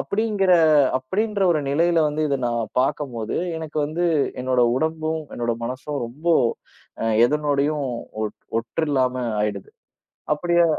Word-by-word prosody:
அப்படிங்கிற 205 -3 +1 0.5
அப்படின்ற 200 +9 -1
ஒரு 155 - 0
நிலையில 165 +3 +3
வந்து 150 +1 -2
இத 140 - +1
நான் 120 -1 -2
பார்க்கும்போது 130 -5 -2 0.2
எனக்கு 155 -1 -5
வந்து 165 +4 -2 0.4
என்னோட 130 -1 +1 0.2
உடம்பும், 160 +2 -1
என்னோட 120 -1 -1
மனசும் 130 +4 -4
ரொம்ப 145 +9 -6 0.7
அ - - 0 0.2
எதனோடயும் 145 +1 0 0.7
ஒட்று 115 +8 -2
இல்லாம 130 -2 +1 0.3
ஆயிடுது. 100 -2 -3 0.6
அப்படியே 170 +2 +2
150 Hz, 115 wpm, -23 LUFS, 130-165 Hz, 0.7 s, நிலையில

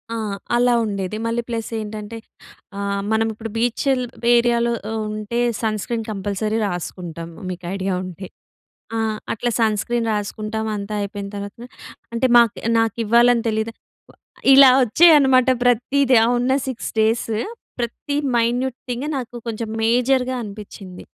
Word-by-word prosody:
ఆ! - - -2 0.4
అలా 245 0 +3
ఉండేది. 200 -1 -3
మళ్ళీ 230 +1 0
ప్లస్ 230 -1 -3
ఏంటంటే, 215 +1 -6 0.6
ఆహ్, 200 0 -2
మనం 220 0 +2
ఇప్పుడు 220 +1 -7
బీచ్చెల్ 250 +3 +1 0.3
ఏరియాలో 235 0 +2 0.2
ఆహ్, 225 - -2 0.2
ఉంటే 215 +2 -4 0.2
సన్ 215 -2 -1
స్క్రీన్ 230 -2 -3
కంపల్సరీ 205 +2 -2
రాసుకుంటాం, 175 -2 -6 0.2
మీకు 180 0 -7
ఐడియా 195 -1 -1
ఉంటే. 185 +1 -8 0.7
ఆ! - - 0 0.3
అట్లా 240 +2 -2
సన్ 220 -2 +2
స్క్రీన్ 235 -1 -1
రాసుకుంటాం. 215 +1 -3
అంతా 200 +1 -5
అయిపోయిన 200 0 -5
తర్వాతన 205 +4 -7 0.5
అంటే, 255 +3 +2
మాక్ 235 -3 +4 0.2
నాకివ్వాలని 230 +2 +3
తెలీదా? 220 +1 -2 0.4
వ - - -25 0.4
ఇలా 270 -1 +9
వచ్చేయనమాట 265 -1 +5 0.2
ప్రత్తీది. 250 +2 +3
ఆ - - +1
ఉన్న 250 +2 +1
6 260 -3 -4
డేస్, 225 +1 +1 0.5
ప్రతి 240 +4 -4 0.2
మైన్యూట్ 245 +2 0
థింగే 250 +5 -3
నాకు 245 -2 -6
కొంచెం 225 0 -3 0.2
మేజర్‍గా 250 +2 +2
అనిపిచ్చింది. 200 -3 -10
225 Hz, 135 wpm, -21 LUFS, 210-245 Hz, 0.7 s, ఇలా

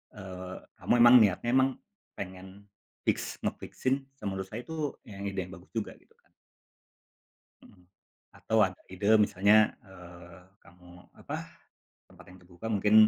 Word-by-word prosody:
eee, 95 -2 -8 0.2
kamu - - +1
emang 120 +1 +9
niatnya 105 +2 +2
emang 130 0 +5 0.5
pengen 95 +1 -9 0.4
fix - - -1
nge - - +1
fix-in 130 +1 -1 0.2
se 135 - -22
menurut 95 0 -4
saya 110 +5 -6
itu 155 -2 -3
ide 100 -2 -5
yang 90 - -11
bagus 90 +2 -19
juga 110 - -3
gitu - - -27
kan. - - -35 1.4
Mhm. 90 -3 -19 0.5
Atau 110 - -1
ada 95 -2 +1
ide 100 +4 +4
misalnya, 105 +1 +4
eee, 90 -3 -13 0.2
kamu 90 0 -18 0.3
apa - - -4 0.7
tempat - - -16
yang 90 - -14
terbuka 90 +4 -11
mungkin, 105 0 +2
95 Hz, 140 wpm, -29 LUFS, 90-110 Hz, 1.4 s, emang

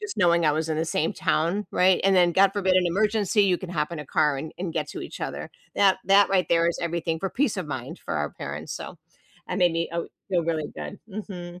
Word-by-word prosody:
just 420 -1 -6
knowing 170 -3 +4
I 150 - +4
was 160 +1 -1
in 155 - -1
the 160 - 0
same 160 0 0
town, 175 +7 0
right, 185 0 +4
and 195 0 +4
then 175 -1 +4
God 195 +1 +4
forbid 190 -2 +1
an 180 -1 +3
emergency, 210 +2 +2
you 185 -2 +3
can 185 -2 -7
hop 155 -1 -2
in 165 - -5
a 150 - -7
car 150 -2 +2
and 155 +3 -6
and 175 -2 -3
get 155 -3 -2
to - - -7
each - - -8
other. - - -5 0.2
That 195 -2 +4
that 195 +1 +5
right 190 -2 +2
there 170 0 +3
is 170 - -2
everything 170 -1 -2
for 195 +3 -3
peace 260 -5 0
of 180 -4 -3
mind 130 -3 -6
for - - -3
our 75 -1 -1
parents. - - -6
So, - - -7 0.5
I 180 - -2
made 180 -3 +3
me 165 0 -1
o 170 0 -3 0.2
feel 175 -3 +1
really 160 -2 -1
good. 205 - -7
Mhm. 180 -4 -7
175 Hz, 255 wpm, -25 LUFS, 160-195 Hz, 0.5 s, that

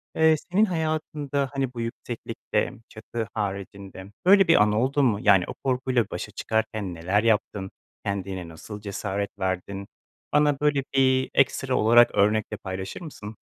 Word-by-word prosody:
Eee, 160 0 +5 0.2
senin 210 +4 +4
hayatında, 155 -5 -2
hani, 135 -2 -2
bu 120 - -5
yükseklikte 115 +1 -3 0.2
çatı 110 0 -5
haricinde 100 -2 -5 0.2
böyle 195 +1 +7
bir 165 - +6
an 105 0 +4
oldu 130 +6 +1
mu? 110 -6 +2
Yani 95 -3 +5
o - - -5
korkuyla 130 -3 +1
başa - - -5
çıkarken 110 -4 -2
neler 95 +6 0
yaptın, 105 -3 0 0.3
kendine 95 -3 -3
nasıl 100 +6 -9
cesaret 100 0 -3
verdin, 95 +1 -3 0.5
bana 150 -2 +3
böyle 145 -2 +2
bir 130 -1 +3
ekstra 135 -1 +2
olarak 120 +2 +5
örnekle 105 +1 +2
paylaşır 95 - -6
mısın? 110 -10 -9
110 Hz, 140 wpm, -25 LUFS, 100-135 Hz, 0.5 s, böyle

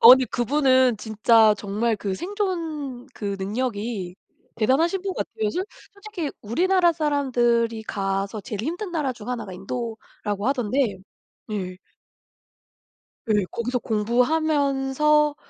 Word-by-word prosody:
아니 260 0 +6
그분은 260 -1 +3
진짜 220 0 +4
정말 210 +3 -1
그 195 -2 -3
생존 325 - -3
그 200 -2 -3
능력이 205 -3 -3 0.4
대단하신 305 - +2
분 390 -2 -3
같아요. 215 -1 -2
솔 365 - -2 0.3
솔직히 400 -7 -5
우리나라 345 - +3
사람들이 240 -7 +1
가서 195 +1 -2
제일 210 +1 -5
힘든 355 - -3
나라 300 -6 -1
중 230 0 -11
하나가 230 -6 -4
인도라고 210 0 -5
하던데 245 -5 +1 0.5
예. 185 -3 -4 1.6
예. 205 -2 +3
거기서 245 +2 -1
공부하면서 280 +5 +2
245 Hz, 250 characters per minute, -24 LUFS, 215-300 Hz, 1.6 s, 아니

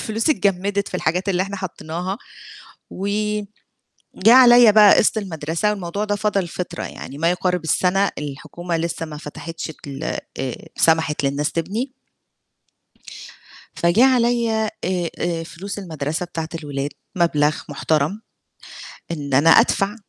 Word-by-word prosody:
والفلوس 225 +6 0
اتجمِّدت 200 -4 0
في - - -11
الحاجات 180 +3 -1
اللي 185 -1 +2
إحنا 200 +1 -5
حطيناها، 180 +2 -5 0.7
وجه 210 +1 -2 0.9
عليَّ 240 -3 +8
بقى 210 -1 +7
قسط 220 - +3
المدرسة 165 +1 -2
والموضوع 200 0 -3
ده 205 -1 -1
فضل 200 -4 0
فترة 180 +2 -5
يعني، 140 +2 -8
ما 165 +2 +2
يقارب 180 -1 -1
السنة 190 +5 +2
الحكومة 160 +4 -5
لسّه 165 0 -3
ما 150 -1 -8
فتحتش 165 +2 -7 0.2
ال 140 -1 -7 0.4
آآ 130 -2 -3 0.2
سمحت 160 -3 +2
للناس 140 +2 0
تبني 210 - -3 1.8
فجِه 170 +9 +3
عليَّ 240 -2 +2 0.3
آآ 180 -2 -1
آآ 170 -1 -1
فلوس 195 +5 -7
المدرسة 160 -2 -4
بتاعة 165 -2 -5
الولاد 145 -3 -4 0.3
مبلغ 155 -3 +2
محترم 155 +7 -1 0.9
إن 145 -4 -4
أنا 145 +5 +5
أدفع، 205 0 +4
180 Hz, 125 wpm, -21 LUFS, 160-205 Hz, 1.8 s, عليَّ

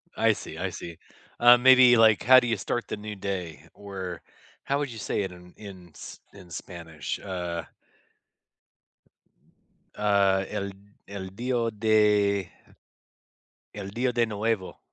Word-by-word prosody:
I - - +3
see, 80 - -9
I 95 +3 -2
see. 85 -1 -9 0.4
Uh, 120 +1 +8
maybe 125 -1 +7
like, 110 -2 +5
"How 130 +2 +8
do 120 - -3
you 115 -2 0
start 120 +4 -3
the - - -5
new 105 0 -7
day?" 90 -6 -6
Or 95 -3 -7 0.4
how 140 +1 -1
would 145 -2 -2
you 115 - -9
say 100 - -2
it 95 - -5
in 90 0 -15
in 95 -4 -11
S - - -11
in 95 -3 -14
Spanish? 80 -5 -7
Uh 90 -3 -5 2.3
Uh, 100 -2 +2
el 100 -2 -4 0.3
el 95 -1 -8
dios 120 0 -1
de 105 -3 +2 1.3
el 100 -2 -7
dios 125 +3 -1
de 120 -1 +1
nuevo. 105 -2 -2
100 Hz, 140 wpm, -26 LUFS, 90-115 Hz, 2.3 s, Uh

